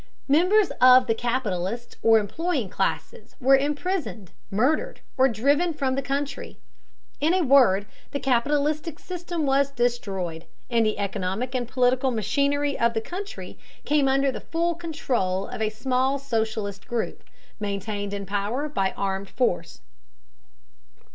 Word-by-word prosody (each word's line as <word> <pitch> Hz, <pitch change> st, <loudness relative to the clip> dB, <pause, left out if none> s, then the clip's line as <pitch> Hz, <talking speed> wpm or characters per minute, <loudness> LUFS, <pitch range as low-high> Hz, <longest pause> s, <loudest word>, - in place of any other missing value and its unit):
Members 365 Hz, +8 st, +4 dB
of 255 Hz, 0 st, +8 dB
the 230 Hz, -, +2 dB
capitalist 235 Hz, -2 st, -2 dB
or 225 Hz, 0 st, +6 dB
employing 260 Hz, -, -1 dB
classes -, -, -3 dB
were 270 Hz, +1 st, +6 dB
imprisoned, 290 Hz, -, -2 dB, 0.2 s
murdered, 295 Hz, -, 0 dB, 0.2 s
or 265 Hz, 0 st, +5 dB
driven 285 Hz, +9 st, +1 dB
from 270 Hz, -3 st, 0 dB
the 275 Hz, -, -1 dB
country. 275 Hz, +1 st, -4 dB, 0.6 s
In 320 Hz, +5 st, +2 dB
a 370 Hz, -, +2 dB
word, 250 Hz, -9 st, +5 dB, 0.2 s
the 280 Hz, -, -3 dB
capitalistic 290 Hz, +5 st, 0 dB
system 345 Hz, -3 st, -4 dB
was 275 Hz, 0 st, +3 dB
destroyed, 195 Hz, -10 st, -2 dB, 0.3 s
and 230 Hz, -1 st, +3 dB
the 215 Hz, -, -1 dB
economic 200 Hz, +4 st, -2 dB
and 245 Hz, -2 st, -1 dB
political 255 Hz, +1 st, +2 dB
machinery 280 Hz, +5 st, 0 dB
of 235 Hz, 0 st, +2 dB
the -, -, +2 dB
country 385 Hz, -, -7 dB, 0.3 s
came 290 Hz, -2 st, +3 dB
under 270 Hz, 0 st, +2 dB
the -, -, -7 dB
full 340 Hz, +1 st, -1 dB
control 255 Hz, -, -2 dB
of -, -, -7 dB
a 215 Hz, -, +1 dB
small 260 Hz, +4 st, 0 dB
socialist 220 Hz, -6 st, -3 dB
group, 235 Hz, -2 st, -3 dB, 0.4 s
maintained 205 Hz, 0 st, -3 dB
in 200 Hz, -1 st, -4 dB
power 205 Hz, +9 st, -2 dB
by 195 Hz, -10 st, -1 dB
armed 195 Hz, 0 st, -2 dB
force. 240 Hz, -8 st, -1 dB
255 Hz, 135 wpm, -25 LUFS, 215-285 Hz, 0.6 s, of